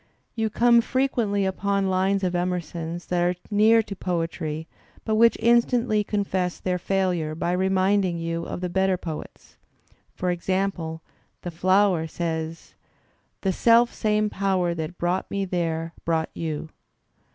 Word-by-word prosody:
You 220 -1 -1
come 235 +2 +4
frequently 235 -6 0
upon 195 +1 0
lines 190 +1 +1
of 180 -1 0
Emerson's 175 -1 -3
that 180 -1 0
are 175 +1 +2 0.2
near 220 +2 +5
to 200 - -7
poetry 165 -3 -3 0.4
but 220 - 0
which 230 +2 +5
instantly 235 -1 +3
confess 190 -4 -1
their 180 -1 -1
failure 180 -5 0
by 170 +2 -1
reminding 190 0 +2
you 165 0 -3
of - - -5
the 180 - -1
better 190 +1 +1
poets. 160 -4 -8 0.6
For 180 0 -1
example, 175 -2 -2 0.4
the 175 - -4
flower 185 -1 +2
says: 160 0 -4 0.7
The 190 -1 0
self 235 +4 +4
same 215 -1 0
Power 190 -3 0
that 165 +1 -5
brought 175 +2 -1
me 200 -1 -1
there 165 -2 -2
brought 160 -1 0
you. 160 -1 -4
185 Hz, 140 wpm, -25 LUFS, 170-200 Hz, 0.7 s, near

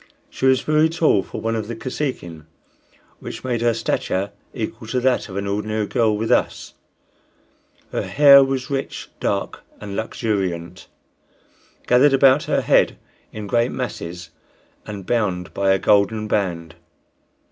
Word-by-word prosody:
She 130 - 0
was 130 -1 +4
very 155 +1 +2
tall 160 - +2
for - - -8
one 115 0 -1
of 110 -2 -3
the 115 - -5
Kosekin, 115 - -5 0.7
which - - -8
made 120 -3 -2
her 120 -1 +2
stature 100 -3 -2 0.2
equal 110 0 -6
to 125 +3 -1
that 125 -2 +1
of 95 - -6
an 100 - -2
ordinary 105 +2 -2
girl 110 -1 +1
with 110 +1 -2
us; - - 0 1.2
her - - -1
hair 140 -1 +7
was 135 +1 -3
rich, 135 0 -4
dark - - -2 0.2
and 100 -1 -7
luxuriant, 95 -6 -3 1.0
gathered 135 +3 +4
about 135 +1 +4
her - - +1
head - - +3 0.3
in 105 -1 -7
great 120 +4 +1
masses 90 -9 -6 0.6
and 100 -3 -7
bound 95 -7 -1
by 100 0 0
a 95 - +4
golden 105 +2 +2
band. 85 -6 -2
110 Hz, 145 wpm, -21 LUFS, 100-130 Hz, 1.2 s, hair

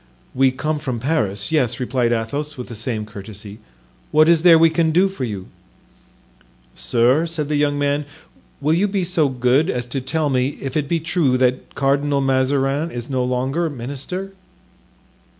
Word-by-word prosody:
"We 135 +1 +4
come 150 +4 -2
from 130 -6 -3
Paris, 110 -7 -1
yes," 125 -7 +1
replied 125 -1 0
Athos, 140 +6 -2
with 125 - -7
the 115 - -7
same 110 -1 -3
courtesy; 105 0 -10 0.5
"what 155 +1 +4
is 165 -1 +5
there 170 -1 +7
we 165 0 +5
can 160 0 +2
do 180 +5 +4
for 190 -9 -4
you?" 100 -5 -5 1.3
"Sir," 125 +7 +2
said 155 -3 -3
the 150 - 0
young 145 0 +1
man, 145 +1 0 0.6
"will 150 +3 +2
you 185 +5 +2
be 195 -2 -1
so 165 -5 +1
good 130 +6 +2
as 125 -6 -2
to 130 +2 -3
tell 150 +3 -1
me 130 +2 0
if 135 -1 -5
it 150 -2 0
be 170 - +1
true 160 -5 +1
that 125 0 0
Cardinal 140 +1 +1
Mazarin 135 +3 +1
is 120 -2 -6
no 130 -1 0
longer 130 +7 -1
minister?" 145 +9 -5
140 Hz, 170 wpm, -20 LUFS, 125-155 Hz, 1.3 s, there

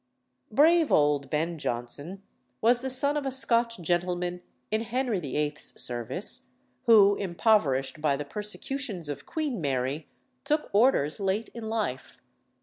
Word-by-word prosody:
Brave 325 +2 +4
old 145 -2 +2
Ben 160 +3 -1
Jonson 145 +11 -3 0.4
was 240 +2 +3
the 265 - -3
son 280 +3 +1
of 295 - -1
a 270 - -1
Scotch 235 -4 +1
gentleman 175 +1 -1 0.3
in 215 +1 +1
Henry 235 -2 -1
VIII.'s 150 0 -2
service, 120 -2 +1 0.4
who, 205 -3 +7
impoverished 170 - +1
by 150 -2 +2
the 145 - -5
persecutions 210 - -4
of 140 -1 -6
Queen 290 - -3
Mary, 135 +1 -2 0.3
took 300 0 -1
orders 205 - +3
late 200 +3 -1
in 230 -2 -7
life. 210 - -3
195 Hz, 135 wpm, -27 LUFS, 150-235 Hz, 0.4 s, who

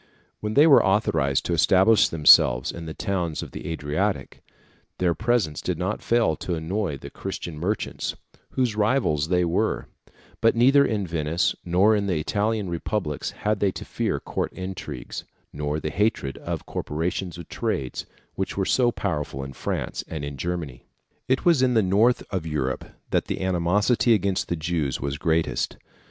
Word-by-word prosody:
When 105 0 -3
they 145 +3 +7
were 150 -4 +7
authorised 85 -9 +1
to 85 - 0
establish 95 +6 +5
themselves 65 -6 +6
in 85 -1 -8
the 80 - -5
towns 90 -5 -2
of - - -9
the - - -7
Adriatic, 80 +1 -2 0.6
their 90 -2 +2
presence 110 -8 0
did 90 -3 -2
not 95 +4 -2
fail 115 -9 +2
to 90 - -3
annoy 85 0 -2
the - - -10
Christian 90 -4 -6
merchants, 100 +6 -2 0.4
whose 125 -5 0
rivals 105 - +1
they 90 0 +2
were; 85 - 0 0.6
but 115 0 +4
neither 135 +4 +6
in 105 -6 -1
Venice 80 +1 0
nor 95 +5 +4
in 100 -1 0
the 90 -4 0
Italian 105 +4 -1
republics 85 -2 -2
had 105 -1 -2
they 100 - +3
to - - -7
fear - - -1
court - - -3
intrigues, 90 -8 -6 0.3
nor 75 +1 -2
the 75 0 -3
hatred 105 -8 0
of - - -5
corporations 85 +3 -3
of 85 - -9
trades, 65 -2 -3 0.3
which 95 - -4
were 95 - +1
so 120 +3 +3
powerful 75 - -3
in 70 0 -7
France - - -3
and 75 -3 -5
in 70 0 -6
Germany. 80 -4 -4 0.4
It 130 +1 +1
was 170 -6 +5
in 125 -2 +3
the 110 - +4
north 105 +6 +3
of 90 -5 -2
Europe 65 -4 -2 0.3
that - - +1
the - - -4
animosity 100 +7 +3
against 100 -2 0
the 85 - -1
Jews 80 -4 -1
was 70 +1 -3
greatest. 80 0 0
90 Hz, 170 wpm, -25 LUFS, 75-105 Hz, 0.6 s, they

